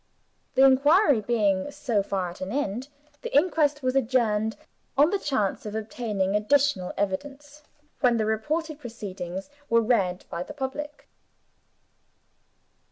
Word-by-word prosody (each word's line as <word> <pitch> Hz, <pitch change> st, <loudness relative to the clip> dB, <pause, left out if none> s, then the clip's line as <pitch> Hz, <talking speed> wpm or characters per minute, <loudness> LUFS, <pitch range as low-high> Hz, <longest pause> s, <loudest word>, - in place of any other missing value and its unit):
The 265 Hz, -, +7 dB
inquiry 280 Hz, -, +5 dB
being, 205 Hz, -1 st, +1 dB
so 235 Hz, -7 st, -1 dB
far, 190 Hz, -3 st, -2 dB
at 175 Hz, -, -14 dB
an 185 Hz, +1 st, -4 dB
end, 250 Hz, -1 st, -2 dB, 0.3 s
the -, -, -5 dB
inquest 295 Hz, -3 st, +2 dB
was 255 Hz, +1 st, 0 dB
adjourned 220 Hz, -4 st, +1 dB, 0.4 s
on 295 Hz, +5 st, +5 dB
the 405 Hz, -, 0 dB
chance 260 Hz, -, -1 dB
of 210 Hz, 0 st, -6 dB
obtaining 210 Hz, -3 st, -2 dB
additional 215 Hz, -3 st, +2 dB
evidence, 285 Hz, +9 st, -4 dB, 0.4 s
when 245 Hz, -3 st, +3 dB
the 220 Hz, -, +1 dB
reported 300 Hz, +9 st, -2 dB
proceedings 195 Hz, -5 st, -7 dB, 0.2 s
were 230 Hz, -, +5 dB
read 195 Hz, -6 st, +1 dB
by 170 Hz, -, -3 dB
the -, -, -7 dB
public. 290 Hz, +2 st, -5 dB
235 Hz, 130 wpm, -26 LUFS, 205-285 Hz, 0.4 s, The